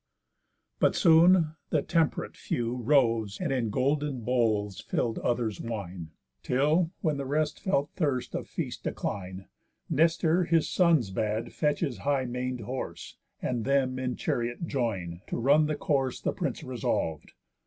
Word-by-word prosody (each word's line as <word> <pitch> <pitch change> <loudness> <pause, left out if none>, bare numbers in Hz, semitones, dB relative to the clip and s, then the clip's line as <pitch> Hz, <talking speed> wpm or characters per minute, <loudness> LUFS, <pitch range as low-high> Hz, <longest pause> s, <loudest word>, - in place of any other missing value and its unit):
But - - +3
soon 165 -1 +5
the 150 - +1
temp'rate 165 -3 0
few 120 0 -2
Rose, 115 -5 +2
and 175 -6 -1
in 125 -4 0
golden 140 +2 0
bowls 110 -5 0
fill'd 115 -2 -1
others 120 -3 -1
wine. 95 -7 -5 0.3
Till, 150 - +2
when 155 -4 0
the 140 - -3
rest 150 +1 0
felt 145 -7 0
thirst 140 -8 -1
of - - -4
feast - - -5
decline, 95 -1 -4 0.5
Nestor 165 +3 +3
his 165 -1 +2
sons 160 - +3
bad 110 +4 -2
fetch 150 -1 0
his 140 -8 -2
high 140 -2 0
man'd 125 0 -3
horse, 130 +5 -6 0.3
And 120 -3 -1
them 130 -1 +1
in 125 -1 -2
chariot 120 +6 -2
join, 100 - -2
to - - -3
run 145 +6 +4
the 155 - -1
course 135 -3 0
The - - -1
prince - - -3
resolv'd. 80 -2 -2
130 Hz, 145 wpm, -28 LUFS, 115-150 Hz, 0.5 s, soon